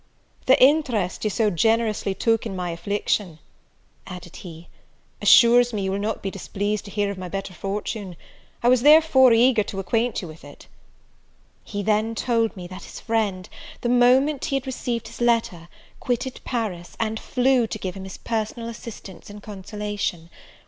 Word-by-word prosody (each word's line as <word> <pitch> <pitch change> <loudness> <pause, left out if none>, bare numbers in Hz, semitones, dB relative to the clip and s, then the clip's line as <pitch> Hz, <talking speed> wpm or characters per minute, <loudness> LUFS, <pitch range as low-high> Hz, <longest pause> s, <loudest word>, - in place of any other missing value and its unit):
"The 260 - +6
interest 255 - +2
you 215 - +1
so 210 +1 +1
generously 215 +1 +1
took 225 +1 +1
in 195 - -6
my 180 -1 -3
affliction," 200 -1 -2 0.7
added 180 -2 -9
he, 170 -2 -11 0.5
"assures 240 +3 +6
me 205 -2 -2
you 190 - -1
will 195 - -2
not 210 +2 -3
be 195 - -2
displeased 205 +2 -3
to - - -9
hear 205 0 -1
of 195 - -8
my 180 -1 -6
better 195 0 -5
fortune; 200 0 -5 0.5
I - - +3
was 250 -1 +5
therefore 295 -3 +6
eager 235 0 +4
to 200 -1 -5
acquaint 225 +3 -1
you - - -6
with 155 0 -12
it." 145 0 -13 1.0
He 205 -1 -5
then 220 +2 +1
told 230 -3 0
me 180 - -7
that 185 +2 -9
his - - -10
friend, 205 -5 -1 0.3
the 240 - -1
moment 255 +4 +3
he 285 - -1
had 270 0 -2
received 245 -3 -3
his - - -11
letter, 225 -8 0 0.3
quitted 250 +1 -3
Paris, 205 -8 -4
and 220 -1 -1
flew 250 -2 +2
to 215 - -5
give 185 -3 -5
him 190 -1 -8
his 190 - -9
personal 230 +1 -3
assistance 215 -5 -10
and 205 0 -11
consolation. 205 -4 -5
215 Hz, 170 wpm, -23 LUFS, 190-235 Hz, 1.0 s, The